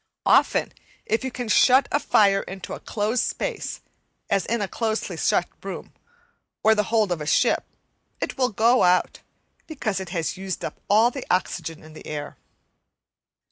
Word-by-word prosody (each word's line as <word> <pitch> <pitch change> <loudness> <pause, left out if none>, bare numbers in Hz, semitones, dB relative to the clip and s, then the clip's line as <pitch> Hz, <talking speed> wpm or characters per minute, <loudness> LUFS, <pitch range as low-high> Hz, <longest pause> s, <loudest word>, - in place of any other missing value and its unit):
Often, - - +3 0.3
if 225 +3 0
you 260 - -2
can 245 -1 -5
shut 255 +5 +5
a 290 - +2
fire 200 -8 +3
into 190 0 -8
a - - -6
closed 220 +3 -1
space, - - -3 0.5
as 195 -1 +1
in 235 +1 0
a 205 - -1
closely 220 +2 -2
shut - - +1
room - - -7 0.7
or 220 - +6
the 210 -1 +1
hold 220 -4 +2
of 170 -3 -1
a 150 - -5
ship, - - +2 0.5
it - - -3
will 255 -2 +1
go 230 +4 +3
out, 180 0 +2 0.5
because 225 - -2
it 190 -3 -6
has 165 -1 -2
used 190 -1 -4
up - - -7
all 220 +4 +5
the 270 0 -6
oxygen 165 -3 -2
in 155 0 -14
the - - -12
air. 145 -1 -5
210 Hz, 170 wpm, -24 LUFS, 185-235 Hz, 0.7 s, or